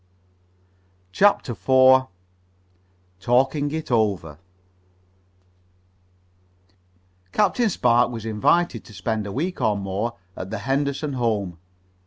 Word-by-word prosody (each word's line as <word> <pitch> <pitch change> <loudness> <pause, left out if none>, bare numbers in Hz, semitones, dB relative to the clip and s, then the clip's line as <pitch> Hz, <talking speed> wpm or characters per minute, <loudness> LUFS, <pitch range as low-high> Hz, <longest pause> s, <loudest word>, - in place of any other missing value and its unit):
CHAPTER 200 - +2
IV 130 +2 +4 1.1
TALKING 135 +7 +1
IT 155 -2 -5
OVER 100 -10 0 2.9
Captain 215 - +2
Spark 120 - +2
was 115 -2 -7
invited 115 +6 +1
to 105 - -14
spend 105 +2 -3
a - - -6
week 170 - -3
or 110 -3 +1
more 100 +4 -3 0.2
at 95 - -7
the 110 - -4
Henderson 140 +2 -2
home. 105 -9 -2
120 Hz, 95 wpm, -23 LUFS, 105-140 Hz, 2.9 s, IV